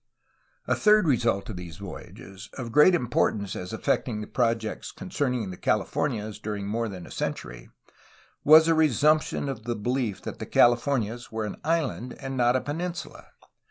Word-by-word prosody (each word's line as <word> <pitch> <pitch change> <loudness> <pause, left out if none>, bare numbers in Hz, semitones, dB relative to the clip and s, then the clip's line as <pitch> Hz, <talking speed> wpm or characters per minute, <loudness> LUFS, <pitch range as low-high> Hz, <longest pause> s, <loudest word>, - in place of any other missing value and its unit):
A - - +1
third 210 -4 +4
result 115 -7 +1
of 95 - -7
these 85 -2 -8
voyages, 95 0 -10
of 120 -3 -6
great 150 +7 +6
importance 110 - 0
as 90 0 -6
affecting 110 -1 -1
projects 115 -3 -1
concerning 125 - -2
the 90 - -8
Calif 105 -2 0
ornias 110 -6 -2
during 105 -2 -4
more 115 +3 -2
than 90 -3 -8
a - - -13
century, - - -5 0.7
was 155 +2 +8
a 165 - +4
resumption 155 0 +2
of 115 -5 -5
the 120 0 -2
belief 120 -1 -2
that - - -6
the - - -6
Californias 120 -1 +2
were 110 -1 -2
an 105 - -6
island 145 -6 -1
and 135 -1 -6
not 120 0 +3
a 130 - +1
peninsula. 170 +4 -5
120 Hz, 160 wpm, -26 LUFS, 105-140 Hz, 0.7 s, was